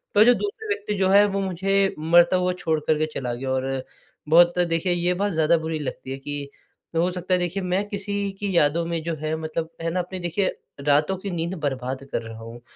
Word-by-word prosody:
पर 210 - +8
जो 245 - +7
दूसरे 415 - -4
व्यक्ति 415 - -2
जो 190 -1 +2
है 200 +1 +7
वो 195 0 -1
मुझे 195 +1 +1
मरता 170 +3 +5
हुआ 180 0 +1
छोड़ 160 -2 0
कर 155 - +3
के 155 - +2
चला 125 -3 -3
गया 130 +2 -4
और 130 0 -1 0.5
बहुत 175 +2 +6
देखिए 175 +1 +2
ये 175 +1 +1
बात 200 +2 -1
ज़्यादा 160 +1 +3
बुरी 160 -1 -3
लगती 135 -2 -5
है 135 - -3
कि 145 0 -5 0.5
हो 170 +2 +2
सकता 180 +1 -2
है 180 - +4
देखिए 180 +2 -2
मैं 185 +3 0
किसी 200 0 -3 0.3
की 200 -3 -2
यादों 160 +3 +3
में 165 -1 -2
जो 165 -1 -2
है 155 +1 -2
मतलब 160 +1 -3
है 165 - -1
ना, 180 - -1
अपने 180 +1 -4
देखिए 175 +3 0 0.3
रातों 150 +6 +2
की 195 0 -5
नींद 170 +1 -2
बर्बाद 130 -2 -3
कर - - -1
रहा 115 0 -9
हूँ, 115 +1 -10
170 Hz, 225 wpm, -24 LUFS, 150-190 Hz, 0.5 s, पर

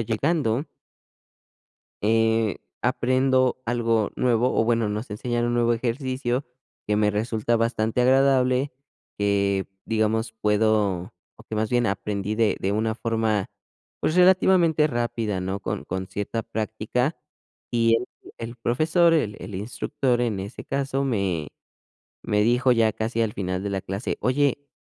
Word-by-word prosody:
llegando 120 +3 0 1.4
eh, 110 -1 +2 0.3
aprendo 130 +1 +2
algo 115 -2 +1
nuevo, 125 0 +2
o 115 - +4
bueno, 115 -2 +1
nos 105 +3 -4
enseñan 120 +3 -2
un 120 0 0
nuevo 120 0 +3
ejercicio 130 +2 -2 0.4
que 105 0 +1
me 105 0 +3
resulta 110 +2 0
bastante 115 0 0
agradable, 130 +1 +3 0.5
que 100 -1 +1 0.2
digamos, 110 +1 0
puedo, 105 -2 +1 0.2
o - - -15
que - - -5
más 110 0 0
bien 120 -1 +2
aprendí 100 +1 -2
de 110 -1 +2
de 95 - -1
una 110 +1 0
forma, 110 -3 -1 0.5
pues, 155 - 0
relativamente 180 -4 +5
rápida, 115 -6 -2
¿no? 95 +2 -3
Con - - -4
con 95 +1 -4
cierta 105 +3 -3
práctica, 110 +7 -2 0.5
y 115 -1 +3
el 120 +2 -3 0.3
el 115 +1 -6
profesor, 155 +9 +2
el 105 -10 0
el 105 - -8
instructor 120 +3 -1
en 110 -5 -1
ese 100 +5 -8
caso, 135 0 -1
me 95 - -1 0.8
me 105 0 +1
dijo 125 +3 +3
ya 115 -3 +3
casi 115 +1 -2
al 105 - -2
final 95 -1 -3
de 100 - -3
la 95 -1 -2
clase: 95 +4 -4
"Oye, 140 +2 +1
115 Hz, 140 wpm, -24 LUFS, 105-125 Hz, 1.4 s, relativamente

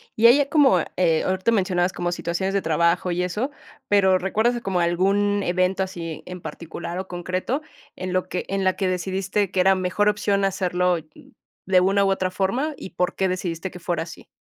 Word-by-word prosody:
Y 225 +2 +6
ahí 240 +4 +7
ya 285 -1 +1
como, 280 - +5 0.2
eh, 165 -3 +2
ahorita 190 +4 +1
mencionabas 185 -4 +1
como 175 0 -2
situaciones 175 +2 -2
de 200 - +1
trabajo 170 +2 +1
y 175 +1 0
eso, 210 +10 -2 0.4
pero, 190 -2 +4
¿recuerdas 220 +6 0
como 190 -4 -1
algún 195 +4 +2
evento 185 +2 +1
así 170 -4 -6
en 180 0 -8
particular 170 +2 -7
o 190 - -5
concreto 185 - -3 0.3
en 185 0 -4
lo 185 0 -1
que 180 - -3
en 195 0 -1
la 185 0 +2
que 190 - 0
decidiste 190 +2 -1
que 190 - -1
era 190 +1 +5
mejor 185 +3 0
opción 200 -1 +1
hacerlo, 180 -2 +1 0.2
mm, - - -17 0.4
de 185 -1 +5
una 195 +2 +3
u 195 - +2
otra 185 -1 -1
forma, 235 +12 -1
y - - -9
por 180 +1 -1
qué 190 - +1
decidiste 180 -1 -3
que 180 - -10
fuera 170 -2 -2
así? 165 -2 -12
185 Hz, 200 wpm, -23 LUFS, 180-195 Hz, 0.4 s, ahí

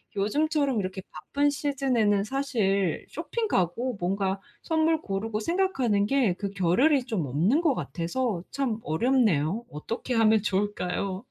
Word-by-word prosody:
요즘처럼 280 +4 +1
이렇게 185 0 -4
바쁜 285 +1 0
시즌에는 265 -8 +1
사실 210 - 0
쇼핑 460 -2 -3
가고 205 - 0
뭔가 195 +2 -1 0.2
선물 320 0 +1
고르고 210 +2 -3
생각하는 265 - +1
게 235 -6 +2
그 200 -1 -4
겨를이 245 - +3
좀 215 - -2
없는 175 - +2
것 315 -6 +3
같아서 185 +1 -2
참 265 -6 -1
어렵네요. 210 - +1
어떻게 230 - -4
하면 220 -2 +4
좋을까요? 195 0 -2
220 Hz, 295 characters per minute, -27 LUFS, 195-275 Hz, 0.2 s, 하면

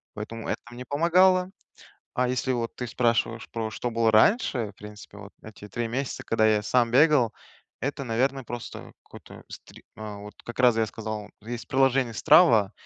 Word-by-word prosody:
поэтому 110 +2 -7
это - - -2
мне 125 +1 -9
помогало. 180 +5 +3 0.6
А 125 0 +1
если, 130 +1 -1
вот 120 -2 -3
ты 125 - -5
спрашиваешь, 115 -1 0
про 115 -1 -3
что 120 +2 -4
было 115 -1 +2
раньше, 115 - +3
в - - -28
принципе, 105 +1 -12
вот - - -12
эти 105 -1 -11
3 120 +2 -3
месяца, 130 +3 -4
когда 110 -1 +2
я 105 -1 +2
сам 120 +2 +2
бегал, 135 -3 +4 0.5
это, 140 +2 -3
наверное, 130 +3 -1
просто 120 0 -8
какой-то - - -14
стри - - -13
вот 105 -1 -9
как 120 - -9
раз 125 -3 +4
я 110 -1 +1
сказал, 110 -1 -6
есть 120 +1 -7
приложение 130 -2 +2
Strava, 110 - +5
120 Hz, 170 wpm, -26 LUFS, 110-130 Hz, 0.6 s, Strava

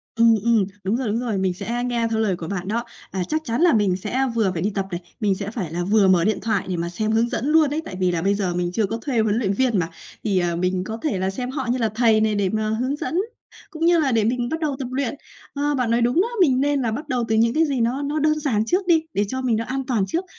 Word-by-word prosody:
Ừm, 230 0 +5
ừm, 230 -4 +3 0.2
đúng 195 +4 0
rồi, 260 -2 -2
đúng 215 +2 0
rồi. 230 -5 -2
Mình 190 -1 0
sẽ 235 +6 -3
nghe 240 -2 0
theo 225 -1 -1
lời 210 -4 +1
của 165 -2 -7
bạn 185 0 -4
đó, 230 +3 -1 0.3
à, 190 -1 -2
chắc 310 0 -1
chắn 235 +5 -1
là 345 -3 +5
mình 205 -4 +2
sẽ 245 +8 -1
vừa 215 -5 +2
phải 165 - -3
đi 200 - +1
tập 195 -1 -1
này, 175 0 -4 0.2
mình 205 -4 +1
sẽ 200 +1 -5
phải 195 -9 -4
là 175 +1 -1
vừa 200 +1 +3
mở 180 -3 +4
điện 215 +2 +1
thoại 220 -3 0
để 180 - -1
mà 170 +1 -2
xem 215 +5 -2
hướng 230 +2 +2
dẫn 240 - -2
luôn 310 -1 +4
ấy. 300 +3 -2
Tại 185 - -7
vì 180 -1 +2
là 170 - -1
bây 200 +3 +2
giờ 190 -3 -1
mình 175 0 -1
chưa 210 +4 +1
có 225 +3 -3
thuê 255 -4 -1
huấn 215 -1 +2
luyện 200 -5 0
viên 235 -1 +1
mà, 165 -1 -1 0.3
thì, 200 -4 +1
à, 175 -1 0
mình 180 +1 0
có 220 +4 -5
thể 235 -12 0
là 190 +1 0
xem 245 +6 -4
họ 265 -3 -3
như 250 - 0
là 225 -3 +1
thầy 225 -2 +4
này 215 -1 +2
để 200 -2 +1
mà 215 +1 -1
hướng 250 +6 -1
dẫn 325 +2 -4 0.5
cũng 325 +1 -3
như 340 -1 +5
là 275 -4 +2
để 225 -2 +2
mình 240 +2 0
bắt 320 - -2
đầu 300 -4 -1
tập 260 - -3
luyện. 265 0 -1 0.4
Ờ, 290 0 0
bạn 250 -3 0
nói 235 +1 +2
đúng 245 +9 +3
đó, 425 - +1
mình 265 -6 +4
nên 285 -1 +1
là 235 -3 0
bắt 295 +8 -5
đầu 250 -4 0
từ 220 - +1
những 230 +1 +3
cái 320 +3 +3
gì 275 -5 -1
nó 245 +4 0
nó 290 +2 -1
đơn 305 +1 +2
giản 230 -8 0
trước 365 - 0
đi, 325 -2 +4
để 205 - +1
cho 260 +5 -3
mình 250 -3 +1
nó 230 - -2
an 265 +2 -3
toàn 230 -6 +1
trước, 340 - -2
230 Hz, 310 wpm, -22 LUFS, 195-265 Hz, 0.5 s, Ừm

